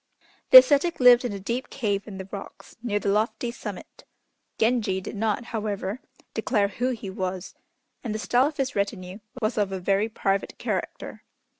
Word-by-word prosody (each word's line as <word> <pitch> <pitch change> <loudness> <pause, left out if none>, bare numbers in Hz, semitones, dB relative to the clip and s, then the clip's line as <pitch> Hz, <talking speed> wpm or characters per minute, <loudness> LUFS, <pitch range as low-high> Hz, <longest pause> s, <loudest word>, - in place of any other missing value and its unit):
The - - +12
ascetic 340 - +5
lived 250 -1 +7
in 240 - -2
a 200 - -5
deep 235 +7 -4
cave 205 -6 -2
in 200 -3 -8
the 190 0 -7
rocks, 200 - -9
near 225 -4 -1
the 205 - -1
lofty 220 +3 0
summit. 210 -5 -9 0.5
Genji 220 -5 +1
did 190 - -7
not, 220 +2 -1
however, 210 0 -3 0.3
declare 205 -5 +1
who 245 +6 -2
he 215 -6 -5
was, 185 -1 -4 0.5
and 220 -4 -3
the - - -1
style 245 +4 +2
of 300 - -7
his 270 -2 -2
retinue 200 -1 -3 0.2
was 215 +1 0
of 200 -2 0
a 190 - -3
very 200 +4 +1
private 195 -2 -2
character. - - -4
215 Hz, 175 wpm, -25 LUFS, 195-245 Hz, 0.5 s, The